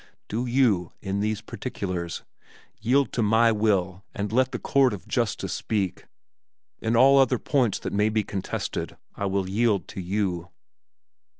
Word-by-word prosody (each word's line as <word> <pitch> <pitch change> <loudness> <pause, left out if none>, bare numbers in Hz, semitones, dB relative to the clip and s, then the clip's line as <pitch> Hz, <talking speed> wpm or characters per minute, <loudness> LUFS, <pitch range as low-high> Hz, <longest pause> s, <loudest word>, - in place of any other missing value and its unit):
Do 120 +4 -2
you, 120 -9 +2
in 95 0 -3
these 105 +1 -1
particulars, 90 -9 -5 0.6
yield 130 +5 +2
to 120 - 0
my 110 +2 +4
will 100 -4 0
and 100 0 -3
let 130 +2 +2
the 125 - -2
court 135 -4 +3
of 100 - -8
justice - - -1
speak; 100 -5 -2 0.7
in 115 +1 0
all 135 +3 +7
other 130 -1 +4
points 125 -4 +1
that - - -5
may 105 +1 +2
be 110 0 +1
contested 95 -1 -4 0.2
I 100 - -3
will 95 -1 -1
yield 105 0 +1
to 95 - -6
you." 90 -2 -2
105 Hz, 155 wpm, -25 LUFS, 95-120 Hz, 0.7 s, all